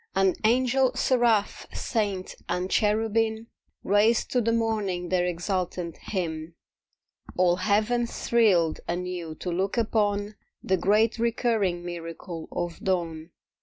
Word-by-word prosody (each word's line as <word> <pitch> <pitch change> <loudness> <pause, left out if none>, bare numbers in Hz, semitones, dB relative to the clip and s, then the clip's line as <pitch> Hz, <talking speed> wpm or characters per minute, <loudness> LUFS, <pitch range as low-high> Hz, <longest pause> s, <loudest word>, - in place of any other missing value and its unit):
And 190 -1 +3
Angel, 255 +3 +3
Seraph, 235 -5 +2
Saint 205 -5 -2 0.2
and 180 +2 -1
Cherubim 220 +1 +1 0.4
Raised 210 +3 +3
to 250 - +2
the 230 0 +1
morning 210 -6 -1
their 180 -1 +2
exultant 180 -1 -2
hymn. 165 -4 -4 0.8
All 180 -1 +3
Heaven 215 +5 +1
thrilled 195 -11 +2
anew 175 -2 -4
to 180 - -4
look 190 +6 -1
upon 210 -2 0 0.3
The 190 - +2
great 215 +5 +2
recurring 225 -6 0
miracle 165 -1 -7
of 175 -1 -4
dawn. 170 -4 -2
195 Hz, 115 wpm, -26 LUFS, 175-225 Hz, 0.8 s, And